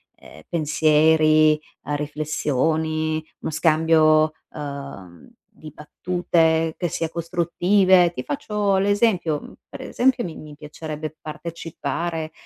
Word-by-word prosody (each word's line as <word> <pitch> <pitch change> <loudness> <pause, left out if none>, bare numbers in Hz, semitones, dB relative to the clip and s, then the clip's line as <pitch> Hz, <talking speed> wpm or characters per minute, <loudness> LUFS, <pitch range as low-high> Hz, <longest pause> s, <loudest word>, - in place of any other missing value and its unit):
ehm, 80 - -15
pensieri, 155 0 +3 0.2
uhm, 145 +1 -3
riflessioni, 155 +1 -1 0.2
uno - - -4
scambio, 155 0 +3 0.2
uhm, 140 - -8 0.2
di 155 -1 -13
battute 160 0 0
che 175 - -1
sia 165 0 -3
costruttive. 175 +2 +2
Ti 125 - -5
faccio 200 +6 -1
l'esempio: 195 -6 +1
mhmm, - - -12 0.2
per - - -9
esempio 255 0 +1
mi 170 -3 -6
mi 150 -1 -11
piacerebbe 155 +1 -7
partecipare 165 0 -5
155 Hz, 105 wpm, -22 LUFS, 150-170 Hz, 0.2 s, pensieri